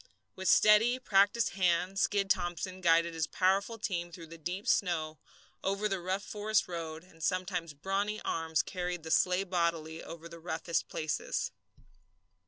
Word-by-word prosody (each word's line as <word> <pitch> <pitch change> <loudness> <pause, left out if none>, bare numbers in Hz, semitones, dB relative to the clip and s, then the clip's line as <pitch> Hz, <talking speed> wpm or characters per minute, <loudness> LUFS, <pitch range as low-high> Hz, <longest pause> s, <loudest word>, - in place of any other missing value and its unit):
With 190 0 -4
steady, 215 +7 +6
practiced 210 -1 +3
hand 185 +1 +1
Skid 200 0 +2
Thomson 185 0 -1
guided 170 -1 +4
his 160 -1 -1
powerful 195 +5 +1
team 175 -5 -3
through 170 -1 -9
the 165 +1 -11
deep 180 +6 -4
snow, 160 -4 +1 0.4
over 200 +2 0
the 195 -2 -1
rough 185 +3 -2
forest 210 +1 0
road; 165 -2 -5
and 165 -3 -19
sometimes 180 -3 -1
brawny 200 +7 -1
arms 160 -1 0
carried 180 -2 -4
the 160 - -5
sleigh 180 +3 +3
bodily 170 -3 -1
over 165 0 -9
the 170 0 -11
roughest 165 0 -2
places. 155 -1 -2
180 Hz, 150 wpm, -31 LUFS, 165-195 Hz, 0.4 s, steady